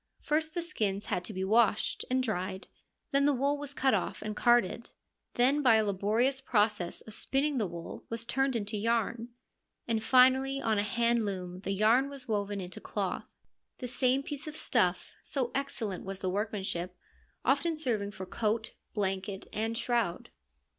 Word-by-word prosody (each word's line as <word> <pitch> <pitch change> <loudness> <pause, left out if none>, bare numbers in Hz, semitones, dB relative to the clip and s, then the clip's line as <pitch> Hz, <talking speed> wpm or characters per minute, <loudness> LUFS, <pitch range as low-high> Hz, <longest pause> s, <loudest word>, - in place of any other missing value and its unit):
First, 315 +2 0
the 345 - -1
skins 210 - -2
had 180 -4 -1
to - - -4
be 190 -2 -3
washed 215 +1 +2
and 255 0 +2
dried; 190 -4 -3 0.4
then 275 0 +3
the 290 - +3
wool 280 +3 +1
was 285 -1 -7
cut 265 0 +3
off - - -1
and 215 0 -4
carded; 240 0 +3 0.5
then 265 +5 +4
by 250 -5 +6
a 220 -1 +3
laborious 220 +7 +1
process 210 -7 +1
of 220 - -10
spinning 275 +4 0
the 210 - 0
wool 170 -1 -8
was 230 0 -4
turned 270 +2 +1
into 210 -1 -1
yarn, 230 +2 0 0.6
and 225 -2 0
finally 260 +2 +5
on 220 -5 +1
a - - +4
hand 235 +2 +2
loom 185 -3 -4
the 195 - -3
yarn 225 +7 +4
was 275 -2 -9
woven 205 -2 -1
into 180 -1 -7
cloth: - - -3 0.5
the 250 - -5
same 255 +2 +2
piece 290 +1 -5
of 305 - -5
stuff, - - +1
so 255 -4 -2
excellent 230 -8 -2
was 195 0 -5
the 185 -1 -1
workmanship, 190 -3 -2 0.5
often 285 +5 +2
serving 225 -9 0
for 190 -2 -7
coat, 220 +3 -1 0.2
blanket 195 -1 -2
and 225 +2 -1
shroud. 235 -3 -1
230 Hz, 170 wpm, -30 LUFS, 200-265 Hz, 0.6 s, by